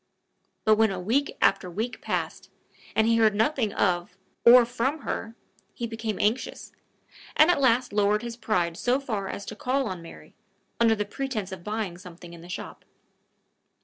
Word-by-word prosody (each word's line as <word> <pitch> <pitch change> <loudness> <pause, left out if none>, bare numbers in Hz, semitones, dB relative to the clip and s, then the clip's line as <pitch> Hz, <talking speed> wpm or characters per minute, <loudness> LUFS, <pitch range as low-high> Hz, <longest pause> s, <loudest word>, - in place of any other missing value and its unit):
But 215 -1 +5
when 220 0 +4
a 190 -2 -4
week 245 +10 0
after 180 - +3
week 220 +8 -4
passed, - - -3 0.5
and 220 - +4
he 230 0 +3
heard 220 -2 +4
nothing 225 0 +1
of 175 -2 0 0.3
or 240 0 +8
from 255 +5 -2
her, 225 -3 -4 0.4
he 235 - -3
became 225 -2 -4
anxious, 220 +5 -1 0.7
and 310 +3 +7
at 315 - 0
last 250 -2 +2
lowered 210 +1 +2
his 235 -1 -5
pride 175 -8 -1
so 250 +2 +1
far 215 -8 -3
as 200 - -6
to 215 - -7
call 265 +5 0
on 185 -4 -5
Mary, 75 - -13 0.5
under 230 -1 +4
the 210 -1 -2
pretense 215 -4 -4
of 185 -2 -8
buying 210 -4 -3
something 175 -2 -12
in 170 - -11
the 175 - -13
shop. 180 - -7
220 Hz, 175 wpm, -26 LUFS, 190-240 Hz, 0.7 s, or